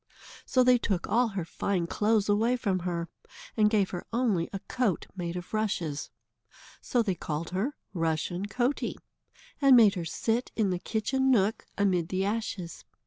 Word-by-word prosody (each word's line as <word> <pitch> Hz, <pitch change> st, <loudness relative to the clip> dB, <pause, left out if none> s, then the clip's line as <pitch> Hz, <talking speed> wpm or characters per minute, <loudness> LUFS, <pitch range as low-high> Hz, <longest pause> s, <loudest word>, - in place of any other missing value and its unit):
So 255 Hz, -1 st, +4 dB
they 250 Hz, -1 st, +5 dB
took 190 Hz, -6 st, -1 dB
all 235 Hz, +4 st, +3 dB
her 195 Hz, -6 st, -4 dB
fine 180 Hz, +1 st, -1 dB
clothes 210 Hz, +3 st, +1 dB
away 225 Hz, +4 st, +2 dB
from 195 Hz, -6 st, 0 dB
her, 170 Hz, -1 st, -3 dB, 0.5 s
and 215 Hz, -2 st, +4 dB
gave 205 Hz, -3 st, +1 dB
her 175 Hz, -, -4 dB
only 225 Hz, -8 st, +1 dB
a 195 Hz, -, -3 dB
coat 245 Hz, -9 st, -1 dB
made 175 Hz, -2 st, -4 dB
of 180 Hz, +2 st, -7 dB
rushes. 185 Hz, -9 st, -1 dB, 0.7 s
So 240 Hz, -2 st, +1 dB
they 200 Hz, -4 st, 0 dB
called 160 Hz, -1 st, -4 dB
her 215 Hz, +11 st, -1 dB, 0.2 s
Rushen 170 Hz, +3 st, -1 dB
Coatie, 245 Hz, +6 st, -1 dB, 0.6 s
and 275 Hz, -2 st, +7 dB
made 220 Hz, -5 st, +7 dB
her 175 Hz, -2 st, -4 dB
sit 230 Hz, +8 st, -1 dB
in 210 Hz, -4 st, +1 dB
the 180 Hz, -, -1 dB
kitchen 265 Hz, +7 st, 0 dB
nook, 215 Hz, -4 st, +2 dB
amid 185 Hz, -5 st, +1 dB
the 190 Hz, +1 st, 0 dB
ashes. 200 Hz, -5 st, -3 dB
200 Hz, 165 wpm, -28 LUFS, 180-230 Hz, 0.7 s, and